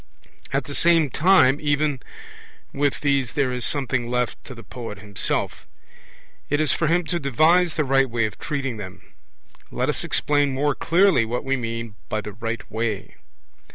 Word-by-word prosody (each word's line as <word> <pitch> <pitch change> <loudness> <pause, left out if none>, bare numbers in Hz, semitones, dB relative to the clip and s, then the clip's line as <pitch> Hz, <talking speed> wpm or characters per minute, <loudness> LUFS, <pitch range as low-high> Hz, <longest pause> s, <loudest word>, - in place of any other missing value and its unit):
At 135 0 0
the 140 - -8
same 165 -3 +3
time 150 -5 +4
even 145 -2 0 0.7
with 145 0 0
these 140 -4 +1
there 140 -3 +1
is 125 -1 -4
something 130 -4 0
left 125 -1 -2
to 130 - -9
the 115 - -11
poet 115 -5 -8
himself; 100 0 -2 0.8
it 145 - +1
is 155 -1 +2
for 165 - 0
him 175 +3 +2
to 175 +1 -2
devise 160 +5 +3
the 155 - +1
right 135 0 +3
way 115 -1 0
of 105 -1 -6
treating 135 -5 -3
them. 100 -2 -10 0.6
Let - - -1
us - - -2
explain 145 -2 +1
more 145 +2 +1
clearly 170 -6 +3
what 120 +3 -3
we 135 0 +1
mean 115 -3 -4 0.2
by 110 - -1
'the 105 0 -8
right 115 +2 -4
way'. 110 -2 -3
135 Hz, 170 wpm, -23 LUFS, 115-150 Hz, 0.8 s, time